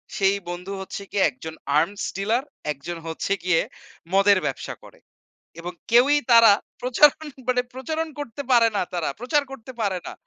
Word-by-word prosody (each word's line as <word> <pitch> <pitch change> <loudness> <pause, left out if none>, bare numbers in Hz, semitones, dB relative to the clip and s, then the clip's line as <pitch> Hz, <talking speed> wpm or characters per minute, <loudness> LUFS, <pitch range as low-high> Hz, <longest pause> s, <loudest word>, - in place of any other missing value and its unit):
সেই 195 0 +3
বন্ধু 180 +2 -6
হচ্ছে 190 +1 -6
গিয়ে 200 - +2
একজন 160 +5 -9 0.2
আর্মস 195 +6 0
ডিলার, 225 +6 0 0.3
একজন 150 +5 -6
হচ্ছে 165 +4 -4
গিয়ে 180 -2 +3 0.5
মদের 200 0 +5
ব্যবসা - - -3
করে। - - -16 0.6
এবং 175 +1 -5 0.2
কেউই 265 +5 +5
তারা 230 -2 +8 0.3
প্রচারণ 290 +5 +4 0.2
মানে 250 -1 +2
প্রচারণ 315 +6 -3
করতে 285 -2 -5
পারে 235 -2 +6
না - - +1
তারা, 175 -4 -1
প্রচার 285 +5 +1
করতে 260 -2 -9
পারে 190 -3 0
না - - -6
205 Hz, 160 wpm, -24 LUFS, 180-255 Hz, 0.6 s, তারা